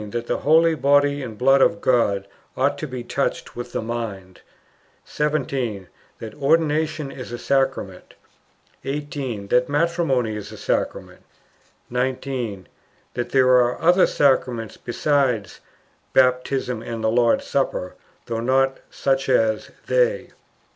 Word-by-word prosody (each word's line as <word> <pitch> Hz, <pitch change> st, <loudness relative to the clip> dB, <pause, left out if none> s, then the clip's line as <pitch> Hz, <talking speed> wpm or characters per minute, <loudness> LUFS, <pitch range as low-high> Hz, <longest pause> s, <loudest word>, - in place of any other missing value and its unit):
That 120 Hz, +2 st, -4 dB
the -, -, -1 dB
holy 165 Hz, +2 st, +4 dB
Body 145 Hz, 0 st, +2 dB
and 115 Hz, -5 st, -7 dB
Blood 135 Hz, +3 st, +4 dB
of -, -, +5 dB
thy -, -, -15 dB
God 100 Hz, -5 st, +1 dB, 0.3 s
ought 135 Hz, +2 st, +2 dB
to 155 Hz, -, -4 dB
be 130 Hz, -2 st, -6 dB
touched 140 Hz, +3 st, -3 dB
with 120 Hz, -, -6 dB
the -, -, -3 dB
mind. 105 Hz, -6 st, -6 dB, 0.6 s
17. 130 Hz, -10 st, -2 dB, 0.3 s
That 110 Hz, -1 st, -8 dB
Ordination 155 Hz, 0 st, +1 dB
is 125 Hz, -2 st, -8 dB
a 120 Hz, -, -4 dB
Sacrament. 130 Hz, -9 st, -1 dB, 0.7 s
18. 135 Hz, -7 st, -4 dB
That 125 Hz, +2 st, +2 dB
Matrimony 145 Hz, -7 st, +1 dB
is 105 Hz, -2 st, -7 dB
a -, -, -10 dB
Sacrament. -, -, -3 dB, 0.7 s
19. 125 Hz, -5 st, -3 dB, 0.5 s
That 120 Hz, 0 st, -3 dB
there 130 Hz, -1 st, +3 dB
are 125 Hz, -1 st, +4 dB
other 175 Hz, +3 st, +5 dB
Sacraments 125 Hz, -5 st, +1 dB
besides 125 Hz, -, 0 dB, 0.5 s
"Baptism 125 Hz, -2 st, +2 dB
and 115 Hz, -1 st, -6 dB
the 110 Hz, -, +2 dB
Lord's 120 Hz, 0 st, +2 dB
Supper," 110 Hz, -9 st, -1 dB, 0.3 s
though 115 Hz, -1 st, -3 dB
not 135 Hz, +2 st, +1 dB
"such 135 Hz, -1 st, -1 dB
as" 110 Hz, -4 st, +2 dB, 0.2 s
they. -, -, +1 dB
130 Hz, 130 wpm, -22 LUFS, 115-140 Hz, 0.7 s, of